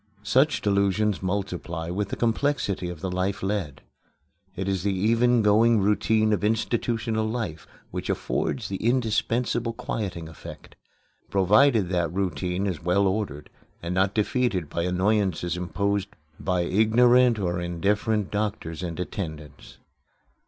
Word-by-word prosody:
Such 135 +8 +2
delusions 100 0 +1
multiply 90 -3 -3
with 100 +2 -2
the - - -3
complexity 115 -6 0
of 85 -3 -8
the 95 - -3
life 95 +2 -2
led. 95 -8 -3 0.7
It 95 +1 -3
is 95 -2 0
the 100 0 0
even 115 +4 +3
going 110 +2 +4
routine 110 +2 +2
of 105 - -1
institutional 110 0 0
life 105 -10 -4 0.2
which - - -5
affords 115 -6 -1
the 95 - -3
indispensable 115 0 0
quieting 100 -8 -4
effect 80 - -11 0.5
provided 105 +2 +4
that 85 -3 0
routine 90 0 -2
is 90 -5 -3
well 90 +3 +2
ordered, 95 -7 -2 0.3
and 85 +1 -2
not 95 +1 +1
defeated 105 - 0
by 85 - -1
annoyances 90 -1 0
imposed 100 +3 -1 0.3
by 90 +2 0
ignorant 120 +6 +4
or 90 -3 -1
indifferent 100 +4 0
doctors 100 -6 -3
and 85 -1 -5
attendants. 80 -5 -6
100 Hz, 130 wpm, -25 LUFS, 90-110 Hz, 0.7 s, going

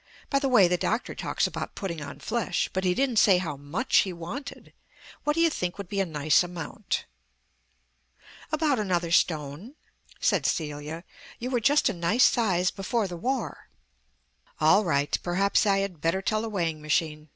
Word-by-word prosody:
By 275 - +3
the 275 -1 0
way, 215 -8 +6
the 180 +1 +1
doctor 225 +3 -1
talks - - -1
about - - -5
putting 170 -5 -4
on 140 - -7
flesh, 210 +3 -1
but 190 - -1
he 180 -1 +2
didn't 260 -4 0
say 195 -3 +6
how 165 -5 -3
much 145 - -1
he 190 - +3
wanted. 180 - -8 0.5
What 295 - +2
do 330 - +2
you 335 -1 +4
think 180 -9 -3
would 200 -3 -7
be 200 - -2
a 195 - +1
nice 150 -2 +3
amount?" 175 -2 -4 1.5
"About 305 -5 +1
another 175 -5 -1
stone," 160 - 0 0.4
said - - +2
Celia. 150 +1 -3 0.3
"You 250 +2 -5
were 245 - +2
just 290 +6 +3
a - - +1
nice 175 +8 +2
size 185 -6 +3
before 205 +2 -1
the 180 - -6
War." 255 +9 -3 0.9
"All 210 - +5
right. 145 -5 +1
Perhaps 195 +4 +1
I 195 -1 +4
had 180 -6 -10
better 180 +4 0
tell 215 +1 0
the 225 - -4
weighing 165 -6 -2
machine. 155 0 -1
185 Hz, 175 wpm, -27 LUFS, 165-225 Hz, 1.5 s, way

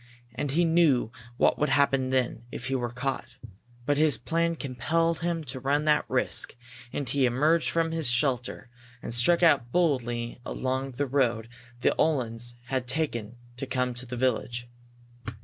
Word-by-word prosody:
And 145 - -3
he 170 +6 +2
knew 160 -9 +3 0.3
what - - +3
would 150 - +1
happen 135 -2 +2
then, 125 -3 0
if - - -6
he 135 - -2
were 120 -2 -2
caught. 125 -1 -4 0.5
But 145 +1 +1
his 155 -2 +5
plan 165 +5 0
compelled 160 +5 -1
him 170 -1 -2
to 130 -2 -4
run 145 +3 0
that 150 -1 +3
risk, - - +1 0.4
and 140 - -3
he 135 0 +2
emerged 150 +7 +2
from 165 -1 0
his 160 -5 +1
shelter, 125 -1 -1 0.3
and 115 - -5
struck 170 +9 +4
out 140 -8 +4
boldly 120 -8 0
along 130 +1 -3
the 140 +4 -1
road 120 -4 0 0.3
the - - +3
Uhlans 120 -5 0
had 130 0 -2
taken 120 -6 -2 0.2
to 135 +1 -5
come 125 -1 -1
to 125 +1 -7
the 125 +1 -5
village. 120 -1 -1
130 Hz, 165 wpm, -27 LUFS, 120-155 Hz, 0.5 s, his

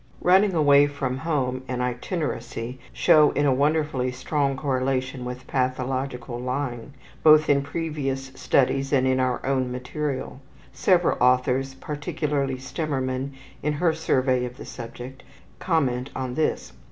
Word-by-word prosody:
Running 190 +1 +4
away 145 -2 +6
from 135 -3 -3
home 130 -4 -1
and 125 -1 -3
itineracy 125 -2 -3
show 150 -2 +5
in 145 - +1
a 135 - +4
wonderfully 145 -2 +1
strong 135 +1 -1
correlation 130 -2 -1
with 125 +1 -6
pathological 130 -1 -2
lying, 125 0 -4 0.3
both 155 0 +6
in 140 -1 +4
previous 140 -3 -3
studies 135 +1 +1
and 130 -3 +3
in 130 0 +2
our 130 -1 0
own 130 -2 0
material. 130 +1 -4 0.3
Several 180 -2 +2
authors, 125 +1 +2
particularly 145 -1 -2
Stemmermann 130 -1 -3 0.3
in 150 +1 0
her 165 +2 +2
survey 130 -5 +1
of 125 0 -6
the - - -9
subject, 120 +2 -9 0.4
comment 135 -7 0
on 130 -2 -3
this. 155 - -1
135 Hz, 130 wpm, -25 LUFS, 130-145 Hz, 0.4 s, away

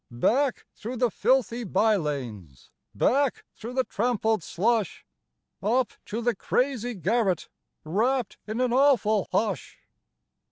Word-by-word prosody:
" - - -55 0.2
Back, 270 +2 0
through 235 +4 -6
the 245 -1 +2
filthy 245 -1 +1
by 215 +2 +2
lanes! 120 - -5 0.2
Back, 275 0 +1
through 235 +3 -8
the 260 0 +2
trampled 225 -3 0
slush! 215 +6 -1 0.6
Up 240 +5 +1
to 230 +3 -4
the 240 0 +2
crazy 245 +2 -1
garret. 195 -3 0 0.3
Wrapped 225 +8 0
in 215 +3 -3
an 250 -2 +1
awful 245 -7 +3
hush. 205 +3 -1
225 Hz, 125 wpm, -26 LUFS, 195-250 Hz, 0.6 s, awful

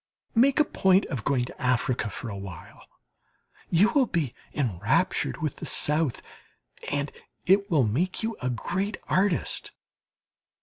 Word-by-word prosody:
Make 260 +5 +4
a 300 - +5
point 190 -6 +3
of 125 -5 -3
going 125 -3 +1
to - - -11
Africa 125 -3 +1
for 115 - -6
a 100 - -5
while 95 -4 -10 0.8
you 185 +6 +4
will 275 -4 +4
be 160 - -1 0.2
enraptured 120 - 0
with 150 - -2
the - - -6
South, 150 -3 +2 0.7
and 145 0 -1 0.3
it 200 +2 +4
will 155 -7 +3
make 155 - 0
you 225 0 -2
a 125 - -1
great 190 - -2
artist. 190 -3 0
150 Hz, 140 wpm, -27 LUFS, 125-195 Hz, 0.8 s, a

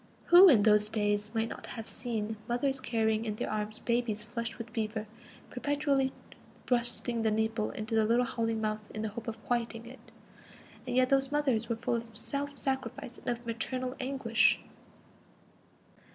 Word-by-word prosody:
Who 365 +2 +11
in 225 -9 +6
those 210 -1 +5
days 205 -1 0
might 225 0 +1
not - - -8
have 225 -2 -6
seen 220 -3 -2
mothers 265 +2 0
carrying 220 -2 +1
in 215 -2 -3
their - - -3
arms 215 0 -2
babies 235 -3 0
flushed 230 0 -4
with 230 -1 -7
fever, 215 -1 -2 0.5
perpetually 280 0 +1 0.5
thrusting 240 -1 0
the 220 - +2
nipple 220 0 0
into 215 +2 -5
the 220 -1 +4
little 235 +3 +3
howling 225 -1 -1
mouth 215 -1 -2
in 215 - -3
the 220 - -1
hope 225 +3 -8
of 225 -1 -6
quieting 230 -1 -2
it? 255 +3 -13 0.8
And 245 - -2
yet 255 0 +4
those 270 0 +2
mothers 265 -7 +1
were 230 - +1
full 225 - -2
of 230 -2 -8
self 285 +3 -3
sacrifice 260 -3 -3
and - - -16
of 240 0 -2
maternal 255 +3 -3
anguish! 255 -4 +2
230 Hz, 165 wpm, -31 LUFS, 220-250 Hz, 0.8 s, Who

